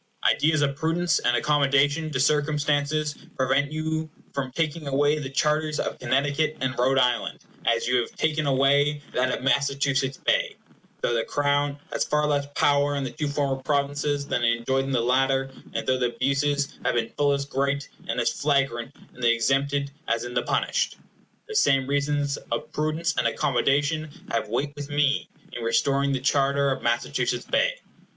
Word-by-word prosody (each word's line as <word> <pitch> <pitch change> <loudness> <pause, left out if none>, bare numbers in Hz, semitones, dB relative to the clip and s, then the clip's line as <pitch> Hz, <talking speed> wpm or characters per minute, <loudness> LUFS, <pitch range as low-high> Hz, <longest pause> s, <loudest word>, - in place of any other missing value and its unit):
Ideas 155 -1 +3
of 140 -1 0
prudence 165 +3 +1
and 120 0 +2
accommodation 145 +3 +2
to 140 -4 -2
circumstances 150 +1 +1 0.2
prevent 135 +2 +1
you 160 0 -2 0.2
from 135 -2 -3
taking 155 +1 -2
away 145 +2 +2
the 135 -3 -5
charters 150 +2 0
of - - -3
Connecticut 145 +5 0
and 130 0 -1
Rhode 130 +2 +2
Island, 125 -2 +1 0.3
as 115 0 +2
you 125 0 +3
have - - -7
taken 155 -1 0
away 140 +2 +2
that 130 0 +1
of - - -3
Massachusetts 140 0 +1
Bay, - - 0 0.5
though - - +1
the 115 -1 +1
Crown 145 0 0 0.2
has - - +1
far 150 0 +1
less 145 -1 0
power 145 0 +3
in 140 - -2
the 130 - -4
two 150 - -3
former 140 -2 -1
provinces 145 0 0
than 120 -4 -1
it 115 0 +3
enjoyed 130 +3 0
in 135 - -3
the 125 -3 +2
latter, 135 +2 +1 0.2
and - - -2
though 130 0 +1
the 120 -1 -1
abuses 140 +2 0
have - - +1
been 115 -1 -1
full 145 -1 +2
as 140 0 -1
great, 140 0 -1 0.2
and - - -1
as - - +2
flagrant, 140 -3 0 0.2
in 125 - -14
the 120 -1 +4
exempted 140 +4 +1 0.2
as 115 0 0
in 120 0 -6
the 125 - +1
punished. - - 0 0.5
The 435 - -7
same 135 - +3
reasons 145 0 0
of 150 +7 -3
prudence 155 +2 -1
and - - +2
accommodation 145 +4 +1 0.2
have 115 -2 -1
weight 140 +6 -1
with 145 0 -7
me 145 -1 +1 0.2
in 120 - -5
restoring 140 +4 +1
the 135 - 0
charter 140 +1 +2
of 130 - -2
Massachusetts 120 0 -1
Bay. - - +1
140 Hz, 175 wpm, -25 LUFS, 130-145 Hz, 0.5 s, the